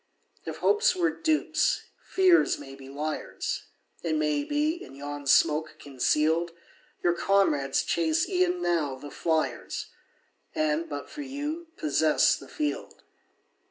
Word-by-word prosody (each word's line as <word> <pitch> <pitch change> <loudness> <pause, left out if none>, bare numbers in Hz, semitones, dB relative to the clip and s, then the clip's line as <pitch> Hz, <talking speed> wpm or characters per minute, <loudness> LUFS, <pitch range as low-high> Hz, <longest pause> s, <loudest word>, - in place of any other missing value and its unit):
If - - -5
hopes 440 +3 +3
were 345 -2 +2
dupes, 315 +9 +1 0.2
fears 370 -2 +4
may 135 -1 -10
be 135 -1 -12
liars; 150 +3 -4 0.4
It 165 -2 -1
may 150 -1 +1
be, 305 - -1
in - - -12
yon 145 0 -6
smoke 150 +3 +3
conceal'd, 155 +5 +1 0.5
Your 175 - +4
comrades 170 -8 +2
chase 320 -1 +1
e'en 360 -2 +1
now 155 -6 +1
the 145 +2 -10
fliers, 160 -2 -2 0.6
And, 155 +2 0
but 145 -1 -5
for 300 - -8
you, 295 +5 -4
possess 310 - +3
the - - -11
field. 300 -1 -4
170 Hz, 125 wpm, -27 LUFS, -, 0.6 s, fears